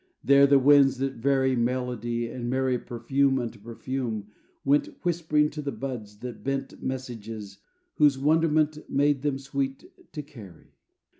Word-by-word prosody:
There 140 0 +6
the 140 0 +6
winds 135 0 +5
that 135 +1 -1
vary 130 +1 +2
Melody 120 -1 -1
and 120 +1 -5
marry 130 -1 +1
Perfume 135 +4 0
unto 120 -3 -4
perfume, 115 -1 -5 0.3
went, 145 +2 +3 0.2
Whispering 160 -3 +1
to 150 - -5
the 140 -1 -3
buds, 115 -8 -6
that 125 -1 -7
bent, 135 0 -3
Messages 115 -5 -6 0.4
whose 145 -3 +5
wonderment 155 +1 +1
Made 145 -1 +2
them 145 -1 0
sweet 135 0 -3 0.3
to 150 - -5
carry. 105 - -14
135 Hz, 140 wpm, -26 LUFS, 120-140 Hz, 0.4 s, There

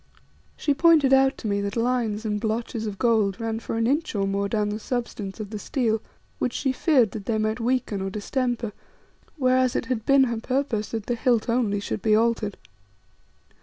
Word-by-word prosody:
She 290 - +1
pointed 300 -2 +5
out 270 +1 +4
to 225 - -5
me 200 -1 0
that 200 0 -3
lines 230 -2 0
and 210 -1 -1
blotches 225 0 -2
of 200 -2 -5
gold 215 -5 +2
ran 225 -1 -2
for 225 - -4
an 225 - +1
inch 285 +1 0
or 195 -1 +1
more 200 +1 -1
down 210 -1 0
the 210 +1 -3
substance 225 -4 -4
of 210 -1 -6
the 215 - -4
steel, 225 -3 0 0.4
which 250 - -1
she 265 - 0
feared 260 - +3
that 210 -3 -7
they 225 - +1
might 215 +1 -1
weaken 235 -4 -1
or 195 - -2
distemper, 235 +2 -2 0.6
whereas 255 -2 +2
it - - -1
had 245 -4 -2
been 275 +2 +5
her 235 -3 -1
purpose 255 -4 -1
that 225 -2 -4
the 245 - -1
hilt 235 -1 +1
only 230 -4 +1
should 200 - -4
be 215 +1 +3
altered. 220 -2 +1
225 Hz, 200 wpm, -25 LUFS, 210-255 Hz, 0.6 s, pointed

